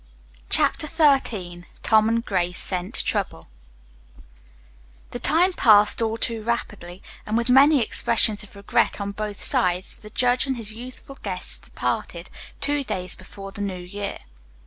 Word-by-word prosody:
CHAPTER 305 Hz, -, +3 dB
XIII 235 Hz, -, +1 dB, 0.2 s
TOM 220 Hz, 0 st, +4 dB
AND 230 Hz, +1 st, 0 dB
GRACE 180 Hz, -2 st, -1 dB
SCENT 185 Hz, +4 st, -1 dB
TROUBLE 195 Hz, -, -2 dB, 1.6 s
The -, -, -5 dB
time 360 Hz, +3 st, +2 dB
passed 210 Hz, -6 st, +5 dB
all 225 Hz, 0 st, -1 dB
too 230 Hz, -1 st, -2 dB
rapidly, 210 Hz, -5 st, -4 dB, 0.2 s
and 215 Hz, +1 st, -1 dB
with 235 Hz, +1 st, +1 dB
many 275 Hz, 0 st, +6 dB
expressions 220 Hz, -1 st, +2 dB
of 210 Hz, -, -12 dB
regret 200 Hz, +1 st, 0 dB
on 200 Hz, 0 st, -3 dB
both 210 Hz, 0 st, -5 dB
sides 180 Hz, +1 st, 0 dB
the 210 Hz, -, -11 dB
judge 250 Hz, +3 st, +1 dB
and 265 Hz, -2 st, -2 dB
his 215 Hz, -2 st, -6 dB
youthful 255 Hz, +4 st, -11 dB
guests 185 Hz, -3 st, -4 dB
parted, -, -, -3 dB, 0.3 s
two 290 Hz, 0 st, 0 dB
days 185 Hz, -7 st, -2 dB
before 195 Hz, +1 st, -11 dB
the 205 Hz, -, -8 dB
New 195 Hz, -2 st, -3 dB
Year. 200 Hz, +3 st, -6 dB
215 Hz, 145 wpm, -23 LUFS, 195-245 Hz, 1.6 s, many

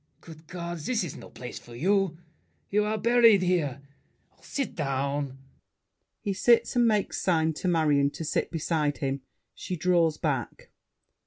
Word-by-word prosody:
Good 160 Hz, -1 st, -14 dB
God! 170 Hz, -1 st, -5 dB
This 220 Hz, +7 st, -1 dB
is 165 Hz, -, -5 dB
no -, -, -11 dB
place 125 Hz, +1 st, -8 dB
for 120 Hz, -, -13 dB
you! 190 Hz, +4 st, +1 dB, 0.5 s
You're 210 Hz, +1 st, +1 dB
buried 230 Hz, -3 st, +5 dB
here. 150 Hz, -7 st, 0 dB, 0.6 s
Sit 275 Hz, -6 st, -3 dB
down! 140 Hz, -2 st, -2 dB, 0.8 s
[He 200 Hz, -, -1 dB
sits 235 Hz, +6 st, +3 dB
and 240 Hz, -1 st, +4 dB
makes 210 Hz, -3 st, 0 dB
sign 160 Hz, -3 st, +2 dB
to 185 Hz, -, -1 dB
Marion 150 Hz, -5 st, +3 dB
to -, -, -4 dB
sit 155 Hz, -, -1 dB
beside 155 Hz, -3 st, -1 dB
him; 135 Hz, -1 st, -2 dB, 0.3 s
she 180 Hz, -, -5 dB
draws 170 Hz, -2 st, +2 dB
back. 135 Hz, -6 st, -3 dB
165 Hz, 145 wpm, -27 LUFS, 145-195 Hz, 0.8 s, buried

